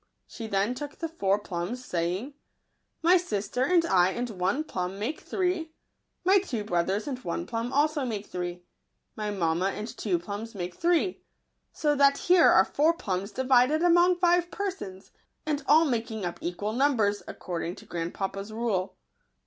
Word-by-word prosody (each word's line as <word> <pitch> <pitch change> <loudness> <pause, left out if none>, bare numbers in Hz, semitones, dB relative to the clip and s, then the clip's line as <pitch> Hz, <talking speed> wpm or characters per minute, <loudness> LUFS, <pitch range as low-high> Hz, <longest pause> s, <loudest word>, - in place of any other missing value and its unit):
She 225 - -8
then 200 +3 +1
took 290 +3 -7
the 330 - -3
four 200 -12 +1
plums, 205 +5 -5
saying, 180 +10 -2 0.3
" - - -48
My 355 +3 +6
sister 245 - -2
and 340 +3 +3
I 180 - +4
and 240 +4 -3
one 195 +9 0
plum 185 - -4
make 230 +10 -3
three; 360 -4 -2 0.5
my 390 +2 +6
two 250 - -4
brothers 190 - 0
and 265 -3 -3
one 340 - -3
plum 230 0 -3
make 265 - -5
also 285 -8 +1
three; 175 -2 -5 0.5
and 210 -1 -3
mamma 170 +2 +1
and 210 +2 -4
two 215 -6 -1
plums 205 +6 -6
make 180 -2 -4
three: 350 - +1 0.5
so 300 -2 +1
that 280 -1 +4
here 360 0 +5
are - - +6
four 315 +4 +2
plums 195 - -3
divided 260 - +3
among 350 +1 +5
five 350 0 +3
persons, 355 - -5 0.3
and 300 -2 -1
all 315 +2 +6
making 225 - -2
up 175 - -4
equal 200 +5 -3
numbers, 230 -6 +2
according 175 0 -4
to - - -14
grand 170 0 -4
papa's 195 +1 -4
rule." 215 -5 -1
230 Hz, 165 wpm, -28 LUFS, 195-310 Hz, 0.5 s, My